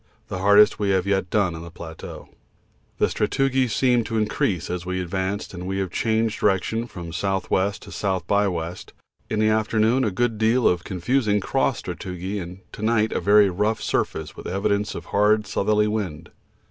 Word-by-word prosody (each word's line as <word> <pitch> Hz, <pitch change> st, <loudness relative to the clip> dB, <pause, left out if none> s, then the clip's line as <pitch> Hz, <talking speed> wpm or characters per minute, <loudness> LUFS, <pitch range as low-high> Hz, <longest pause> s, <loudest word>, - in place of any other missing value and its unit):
the 95 Hz, -, -4 dB
hardest 105 Hz, +2 st, +5 dB
we 100 Hz, -1 st, 0 dB
have 95 Hz, -1 st, +2 dB
yet 95 Hz, -2 st, 0 dB
done 100 Hz, -5 st, +1 dB
on 80 Hz, -, -7 dB
the 85 Hz, -, -8 dB
plateau. 80 Hz, -1 st, -9 dB, 0.7 s
The -, -, +3 dB
sastrugi 135 Hz, -1 st, +1 dB
seemed 120 Hz, 0 st, +2 dB
to 115 Hz, -, -2 dB
increase 105 Hz, -6 st, 0 dB
as 90 Hz, -1 st, -3 dB
we 90 Hz, +1 st, -3 dB
advanced 95 Hz, +3 st, -3 dB
and 90 Hz, +1 st, -5 dB
they 95 Hz, -, -2 dB
have 95 Hz, -2 st, -2 dB
changed 110 Hz, +1 st, 0 dB
direction 110 Hz, +4 st, +1 dB
from 85 Hz, -6 st, -8 dB
S.W. 95 Hz, +2 st, 0 dB
to -, -, -12 dB
S. 95 Hz, -3 st, -1 dB
by 100 Hz, +3 st, +2 dB
W. 85 Hz, -2 st, -2 dB, 0.5 s
In 110 Hz, -, -1 dB
the 110 Hz, 0 st, +3 dB
afternoon 110 Hz, +3 st, +2 dB
a 110 Hz, -, +2 dB
good 110 Hz, +2 st, -1 dB
deal 115 Hz, +3 st, +3 dB
of 90 Hz, -1 st, +1 dB
confusing 105 Hz, +3 st, 0 dB
cross 95 Hz, -, 0 dB
sastrugi, 95 Hz, +2 st, -5 dB
and 90 Hz, +2 st, -9 dB
to -, -, -9 dB
night 110 Hz, 0 st, +2 dB
a -, -, 0 dB
very 100 Hz, -1 st, +5 dB
rough 105 Hz, +4 st, 0 dB
surface 80 Hz, -1 st, -2 dB
with -, -, -8 dB
evidences 100 Hz, +3 st, -1 dB
of -, -, -7 dB
hard 105 Hz, +1 st, +2 dB
southerly 105 Hz, +2 st, +1 dB
wind. 90 Hz, -7 st, -4 dB
100 Hz, 185 wpm, -23 LUFS, 90-110 Hz, 0.7 s, hardest